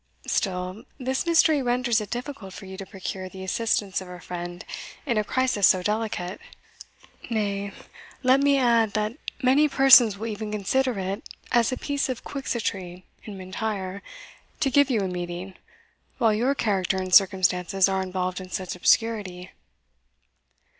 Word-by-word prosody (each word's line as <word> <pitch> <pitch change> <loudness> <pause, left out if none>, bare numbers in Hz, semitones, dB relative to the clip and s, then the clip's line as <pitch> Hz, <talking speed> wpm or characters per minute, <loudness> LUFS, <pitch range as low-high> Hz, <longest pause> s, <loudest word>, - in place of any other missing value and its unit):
Still, 185 +2 -2
this 260 +5 -2
mystery 320 -3 +4
renders 240 -2 +1
it 210 - -7
difficult 245 -6 -6
for - - -9
you 190 0 -8
to 195 0 -8
procure 190 -1 -6
the 190 0 -9
assistance 200 -1 0
of 185 - -10
a 180 0 -9
friend 175 0 -7 0.4
in 235 -6 +1
a - - +1
crisis 255 -4 +2
so 185 -1 +3
delicate 210 -3 -2 0.9
nay, 200 -3 -1 0.5
let 260 +1 +5
me 280 0 +4
add, 230 -5 +3
that 215 +2 -1 0.3
many 280 +4 +4
persons 250 -6 +7
will 220 - -5
even 215 -1 -4
consider 240 +4 0
it 195 +3 -3 0.3
as 240 0 +3
a 255 - -2
piece 285 0 -2
of 255 - -4
Quixotry 190 -9 -4 0.2
in 205 -3 -8
M'Intyre 190 0 -4 0.6
to 275 - +1
give 285 +1 +4
you 230 -5 +1
a 195 - -1
meeting, 180 +1 -5 0.6
while 225 -2 +3
your 250 +6 +1
character 195 -6 0
and 185 -1 -3
circumstances 185 -1 +4
are 190 0 0
involved 185 0 -3
in 185 - -9
such 185 0 -4
obscurity." 185 -2 +1
205 Hz, 155 wpm, -25 LUFS, 185-240 Hz, 0.9 s, persons